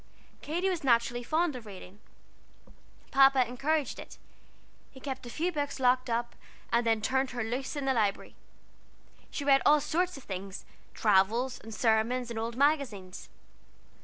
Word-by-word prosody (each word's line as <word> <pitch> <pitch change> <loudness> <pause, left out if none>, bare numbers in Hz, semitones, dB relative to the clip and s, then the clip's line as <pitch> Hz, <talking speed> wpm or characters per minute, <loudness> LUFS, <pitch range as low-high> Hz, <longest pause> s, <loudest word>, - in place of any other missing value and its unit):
Katy 345 +5 -1
was 355 -4 -1
naturally 240 -1 +2
fond 310 +4 0
of 235 -3 -9
reading. 195 0 -11 1.1
Papa 270 -2 +5
encouraged 280 +3 -1
it. - - -10 0.7
He 265 - -14
kept 265 -2 -6
a - - -7
few 335 +8 -1
books 290 -4 -3
locked 255 0 +2
up, 235 +1 -1 0.4
and 235 +1 +3
then 225 -1 +2
turned 265 +2 +1
her 245 -2 -3
loose 250 +6 -3
in 285 -2 -3
the 265 - +2
Library. 210 -5 -1 1.0
She 285 - -5
read 275 -1 +5
all 300 +1 +6
sorts 355 +4 -1
of 275 - -12
things: 190 0 -7 0.3
travels, 225 +5 +2
and 225 - -11
sermons, 235 +2 +1
and 225 - -3
old 230 +1 -4
magazines. 260 -11 0
250 Hz, 155 wpm, -29 LUFS, 225-280 Hz, 1.1 s, all